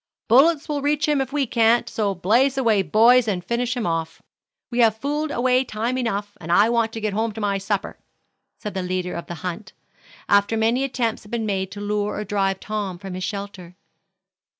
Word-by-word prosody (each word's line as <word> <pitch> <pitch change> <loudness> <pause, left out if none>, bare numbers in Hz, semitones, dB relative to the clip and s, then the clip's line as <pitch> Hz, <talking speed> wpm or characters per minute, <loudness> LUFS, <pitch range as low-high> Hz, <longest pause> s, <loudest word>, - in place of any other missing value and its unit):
"Bullets 285 +6 +4
will 295 -2 -2
reach 295 +1 +1
him 295 -2 +2
if 265 0 -4
we 285 -1 0
can't, 230 0 +3
so 205 -3 -1
blaze 240 +10 +2
away, 225 -6 +3
boys, 230 +5 +5
and 180 -4 -2
finish 245 +3 -1
him 240 - -2
off. 165 -1 -2 0.5
We 240 - -2
have 225 -2 +4
fooled 295 +5 -2
away 255 -1 +2
time 235 +1 -3
enough, 205 -5 -2
and 170 +1 -5
I 205 +5 +5
want 230 -1 +1
to 225 - -4
get 215 -2 -2
home 220 +2 0
to 205 -2 -1
supper," 195 0 -3 0.6
said 210 - -6
the 190 - -2
leader 180 0 -3
of 170 - -6
the 175 - -6
hunt, 185 +2 -5 0.5
after 200 +2 +3
many 230 +4 +2
attempts 245 -4 -1
had 205 - -16
been 230 -1 -2
made 190 -2 -1
to 205 - -7
lure 205 0 -1
or 210 - -3
drive 195 -2 -1
Tom 205 -4 -4
from 190 +1 -8
his 185 0 -5
shelter. 200 -3 -6
215 Hz, 200 wpm, -22 LUFS, 195-245 Hz, 0.6 s, boys